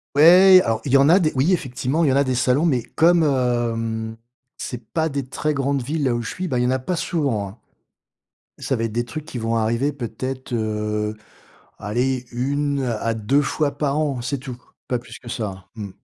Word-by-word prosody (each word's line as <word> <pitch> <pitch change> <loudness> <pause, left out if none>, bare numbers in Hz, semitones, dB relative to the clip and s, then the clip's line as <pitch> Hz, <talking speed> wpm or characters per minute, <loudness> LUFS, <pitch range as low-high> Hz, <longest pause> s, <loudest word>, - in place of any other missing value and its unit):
Ouais, 185 +5 +8
alors 115 0 -1
il 135 - -2
y - - +8
en 140 +2 +5
a 180 +4 +6
des 155 -4 +1
oui 135 +8 +2
effectivement, 145 -1 0
il - - +3
y - - +3
en - - +1
a 140 - +4
des 130 -2 -1
salons, 130 +5 +2
mais 130 -8 +1
comme, 165 +7 +3
hem, 115 -5 -1 0.4
c'est 125 -1 -6
pas 160 -1 +1
des 140 -2 -3
très 150 +3 -2
grandes 140 -1 0
villes, 145 +3 -2
là 125 - +2
où 120 - -2
je 110 - -5
suis, 185 0 -4
bah, 130 -6 -1
il 120 - +1
y - - +1
en - - +2
a 130 - 0
pas 175 +8 -2
souvent, 140 - -1
hein. 100 - -14 1.0
Ça - - -1
va 115 - -1
être 115 - -3
des 120 - 0
trucs 155 +4 -7
qui 145 -5 -7
vont 115 0 -1
arriver 115 +6 +1
peut-être, 130 0 -5
heu, 105 -1 -2 0.6
allez, 125 +5 -1
1 140 +3 -1
à 115 -2 -1
2 115 +6 +1
fois 145 0 -1
par 145 -1 0
an, 140 -5 -1
c'est 140 +2 -2
tout, 130 -2 -7 0.3
pas 125 - 0
plus 120 - -11
que 120 - -11
ça, 100 -5 -5
mmh. 105 -3 -6
130 Hz, 225 wpm, -22 LUFS, 115-145 Hz, 1.0 s, Ouais